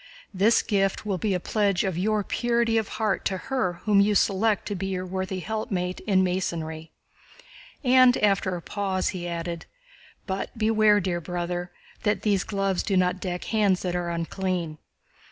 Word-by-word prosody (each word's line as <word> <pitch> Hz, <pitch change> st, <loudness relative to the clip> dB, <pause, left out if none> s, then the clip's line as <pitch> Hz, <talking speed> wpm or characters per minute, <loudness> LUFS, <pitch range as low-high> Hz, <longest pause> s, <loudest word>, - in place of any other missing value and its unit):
This 205 Hz, +5 st, +4 dB
gift 195 Hz, -2 st, 0 dB
will 195 Hz, -3 st, -1 dB
be 200 Hz, +1 st, 0 dB
a -, -, 0 dB
pledge 200 Hz, -1 st, +1 dB
of 190 Hz, -3 st, -1 dB
your 210 Hz, +4 st, +1 dB
purity 235 Hz, 0 st, +1 dB
of 220 Hz, -, -3 dB
heart 215 Hz, -3 st, 0 dB
to 190 Hz, -, 0 dB
her 190 Hz, -4 st, -1 dB
whom 210 Hz, -2 st, +4 dB
you 205 Hz, +1 st, +3 dB
select 205 Hz, +2 st, +2 dB
to 205 Hz, -, -2 dB
be 195 Hz, +1 st, -3 dB
your 185 Hz, -1 st, -3 dB
worthy 190 Hz, 0 st, -3 dB
helpmeet 185 Hz, -4 st, -3 dB
in 190 Hz, -2 st, +4 dB
Masonry." 165 Hz, -3 st, -3 dB, 0.9 s
And 255 Hz, -1 st, +6 dB
after 195 Hz, -3 st, +2 dB
a 170 Hz, -, -7 dB
pause, 195 Hz, -2 st, -1 dB
he 175 Hz, -2 st, -4 dB
added: 170 Hz, 0 st, -4 dB, 0.6 s
"But 195 Hz, +3 st, -4 dB
beware, 215 Hz, -1 st, +4 dB
dear 175 Hz, -2 st, -2 dB
brother, 175 Hz, +1 st, -3 dB, 0.3 s
that 210 Hz, -1 st, 0 dB
these 200 Hz, -3 st, +2 dB
gloves 195 Hz, -2 st, -1 dB
do 195 Hz, -3 st, 0 dB
not 180 Hz, 0 st, +2 dB
deck 180 Hz, -2 st, -4 dB
hands 205 Hz, -4 st, +1 dB
that 180 Hz, -1 st, -1 dB
are 175 Hz, -1 st, -1 dB
unclean." 170 Hz, -1 st, -3 dB
190 Hz, 170 wpm, -26 LUFS, 180-210 Hz, 0.9 s, And